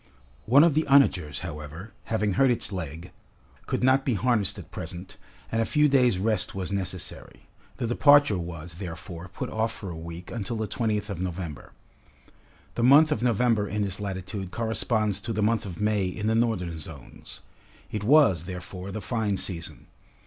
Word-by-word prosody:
One 135 +6 +7
of 170 -3 +4
the 155 +1 +1
onagers, 90 - +3
however, 80 +4 -8
having 105 -3 0
hurt 135 +7 +4
its 120 -4 +1
leg, 85 -2 -6 0.6
could - - -1
not 130 +1 +4
be 130 -4 0
harnessed 105 -2 +1
at - - -10
present, 85 +3 -7 0.4
and 115 - +1
a - - +3
few 150 +5 +3
days' 125 -7 +3
rest 100 -2 +1
was 95 0 -3
necessary. 95 -2 -5 0.3
The - - -2
departure 145 -3 +5
was, 85 -1 -7
therefore, 85 -1 -7
put 95 - -6
off 110 +1 0
for 100 -3 -7
a - - -6
week, 85 +2 -8
until 115 0 -3
the 110 -1 -2
20th 105 -1 -1
of 90 -3 -5
November. 90 -4 -5 1.0
The - - -3
month 145 +5 +7
of 115 - 0
November 115 -3 +2
in 105 +1 -1
this 95 -1 -2
latitude 95 -1 -5
corresponds 110 0 -1
to 115 - -4
the 105 0 0
month 110 -1 +1
of 90 - -8
May 105 -2 +1
in 105 +3 -4
the 110 - +2
northern 95 -8 0
zones. 75 -3 -10 0.5
It 105 -2 -3
was, 120 - +5
therefore, 90 +1 -7
the 105 +2 -5
fine 105 +1 -1
season. 85 -4 -3
100 Hz, 175 wpm, -26 LUFS, 90-115 Hz, 1.0 s, One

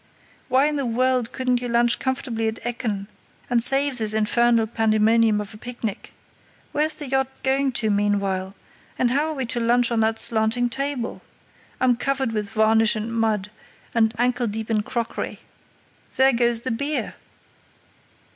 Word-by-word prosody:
"Why 260 +2 +3
in 300 0 0
the 275 - -1
world 250 0 0
couldn't 250 -2 -1
you 245 - -3
lunch 235 0 +2
comfortably 250 -4 -2
at 220 0 -3
Ekken 225 -4 -3 0.5
and 240 -1 +3
save 270 +1 +4
this 215 -1 +2
infernal 230 +1 +2
pandemonium 220 0 +2
of 210 +1 -7
a - - -11
picnic? 235 -3 -6 0.6
Where's 305 +1 +1
the 295 - -5
yacht 265 0 +1 0.2
going 270 0 +1
to 220 -3 +1
meanwhile? 200 -2 -1 0.4
And 245 -1 +1
how 290 +4 +1
are 315 - -4
we 265 -2 -3
to 240 +1 0
lunch 240 +1 +2
on 230 - +1
that 220 0 +1
slanting 230 +2 +2
table? 275 -2 -3 0.6
I'm 250 -2 +2
covered 270 -1 -1
with 210 -2 -3
varnish 220 +1 +3
and 220 +2 -4
mud, 215 -3 -1 0.4
and 225 -1 +2
ankle 245 0 +1
deep 220 +1 -4
in 215 -1 +2
crockery. 230 +2 -4 0.8
There 265 0 +4
goes 235 -1 +1
the 255 - -2
beer!" 280 +6 -1
235 Hz, 160 wpm, -23 LUFS, 220-255 Hz, 0.8 s, save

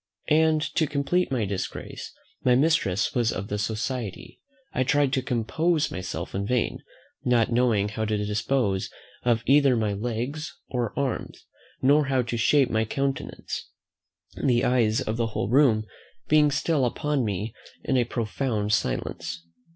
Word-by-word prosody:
And, 155 0 +4
to 155 - +2
complete 145 +5 0
my 120 -5 +1
disgrace, 95 -1 -5 0.3
my 125 -1 +4
mistress 135 - +2
was 120 -2 +2
of 95 +2 -5
the 105 - -2
society. 110 0 -4 0.3
I 130 - +1
tried 140 +1 +2
to 130 - +2
compose 145 +7 0
myself 95 +2 -5
in 100 +1 -2
vain, 125 -1 0 0.4
not 120 -2 +2
knowing 115 -4 +2
how 110 +1 -2
to 110 0 0
dispose 105 0 0 0.3
of 115 -2 +1
either 140 -2 +5
my 110 -2 0
legs 120 +8 -4
or 120 -4 -2
arms, 140 -3 -3 0.4
nor 145 +3 +5
how 135 -2 +1
to 120 0 -3
shape 130 +3 +3
my 110 0 +2
countenance, 135 +4 -3 0.7
the 120 -2 +3
eyes 120 -1 +2
of 110 -2 -2
the 115 -1 +1
whole 95 - -1
room 120 -5 +4 0.4
being 150 -1 +5
still 145 -1 +1
upon 145 +2 0
me 105 +1 -3 0.3
in 135 - 0
a 125 - +4
profound 115 -2 -2
silence. 85 +2 -2
120 Hz, 150 wpm, -26 LUFS, 110-140 Hz, 0.7 s, either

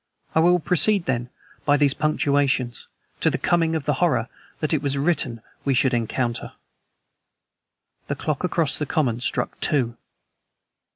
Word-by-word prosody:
I - - +3
will 175 +2 +5
proceed, 180 +4 +3
then, 120 -1 -1 0.3
by 145 0 +3
these 140 -1 +4
punctuations, 140 -5 0 0.3
to - - +3
the - - -1
coming 165 -1 +1
of 155 -3 -3
the 150 - +2
horror 125 -9 +2 0.3
that 155 +1 -1
it 150 - +1
was 140 -1 -1
written 140 -7 0 0.2
we 135 -2 +1
should 130 +1 +3
encounter. 120 +1 -2 1.5
The - - -2
clock 155 +1 -3
across 165 -5 0
the 150 - -2
common 125 -7 0
struck 125 - -2
two. 125 -6 0
145 Hz, 150 wpm, -23 LUFS, 125-160 Hz, 1.5 s, will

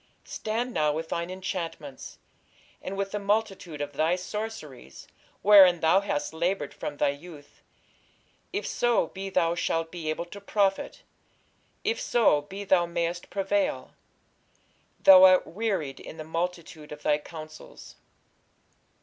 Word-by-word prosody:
Stand 235 +3 -3
now 150 -4 +2
with 160 +2 -4
thine 170 +1 -3
enchantments, 175 -7 -6 0.6
and 195 +1 -6
with 195 0 -2
the 210 - -2
multitude 200 -6 -1
of 145 0 -4
thy 160 +5 +1
sorceries, 180 - -7 0.4
wherein 190 -4 +8
thou 165 +4 +4
hast 145 -7 -3
laboured 170 -2 -1
from 145 - -6
thy - - +2
youth; 145 0 -10 0.9
if 405 - -3
so 240 -1 +1
be 195 +1 -6
thou 170 -3 +2
shalt 165 -1 -1
be 165 -3 -5
able 155 +2 -2
to 200 +4 -11
profit, 200 -1 -1 0.8
if 455 +3 -1
so 235 - +3
be 195 +7 -8
thou 185 -3 +3
mayest 170 +1 -3
prevail. 195 -9 -1 1.1
Thou 190 -1 +10
art 185 -1 +7
wearied 190 -9 -3
in - - -10
the 155 - -6
multitude 165 -1 -5
of 150 0 -9
thy 150 0 +2
counsels. 155 0 -11
175 Hz, 135 wpm, -27 LUFS, 155-195 Hz, 1.1 s, Thou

